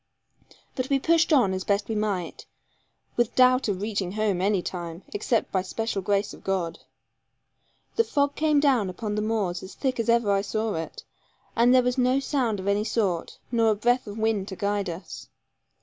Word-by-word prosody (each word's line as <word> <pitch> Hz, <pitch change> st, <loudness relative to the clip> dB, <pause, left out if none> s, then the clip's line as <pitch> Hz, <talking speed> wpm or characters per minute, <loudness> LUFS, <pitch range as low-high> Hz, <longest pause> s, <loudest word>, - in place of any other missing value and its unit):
But 255 Hz, 0 st, -2 dB
we 275 Hz, -, +3 dB
pushed 330 Hz, +4 st, +2 dB
on 245 Hz, -11 st, +4 dB
as 185 Hz, 0 st, -3 dB
best 200 Hz, 0 st, 0 dB
we 225 Hz, -, -2 dB
might, 205 Hz, -5 st, -3 dB, 0.7 s
with 240 Hz, -1 st, +1 dB
doubt 255 Hz, 0 st, +5 dB
of 200 Hz, -1 st, -2 dB
reaching 200 Hz, -4 st, -2 dB
home 210 Hz, -4 st, 0 dB
any 195 Hz, -2 st, +1 dB
time, 170 Hz, -1 st, -6 dB
except 220 Hz, +3 st, 0 dB
by 190 Hz, -, +1 dB
special 205 Hz, +2 st, -3 dB
grace 200 Hz, +2 st, 0 dB
of -, -, -14 dB
God. 185 Hz, -4 st, -2 dB, 1.2 s
The 460 Hz, -, +5 dB
fog 285 Hz, -7 st, 0 dB
came 305 Hz, -1 st, +2 dB
down 260 Hz, -9 st, +3 dB
upon 210 Hz, +3 st, -4 dB
the 210 Hz, -, -1 dB
moors 210 Hz, -5 st, -1 dB
as 190 Hz, -, -10 dB
thick 260 Hz, -3 st, -2 dB
as 230 Hz, -, -1 dB
ever 235 Hz, -3 st, +3 dB
I 195 Hz, 0 st, +3 dB
saw 215 Hz, +1 st, -2 dB
it; 165 Hz, 0 st, -5 dB, 0.5 s
and 235 Hz, +2 st, +5 dB
there 255 Hz, 0 st, +6 dB
was 250 Hz, +1 st, 0 dB
no 255 Hz, +2 st, +3 dB
sound 255 Hz, -7 st, -1 dB
of 185 Hz, -, -6 dB
any 200 Hz, +1 st, +2 dB
sort, 195 Hz, -7 st, -1 dB
nor 230 Hz, -2 st, +3 dB
a 215 Hz, -, +3 dB
breath 240 Hz, +3 st, +1 dB
of 205 Hz, +1 st, -7 dB
wind 220 Hz, -3 st, 0 dB
to 190 Hz, -, -6 dB
guide 200 Hz, 0 st, -1 dB
us. 170 Hz, +3 st, -8 dB
215 Hz, 195 wpm, -26 LUFS, 195-245 Hz, 1.2 s, there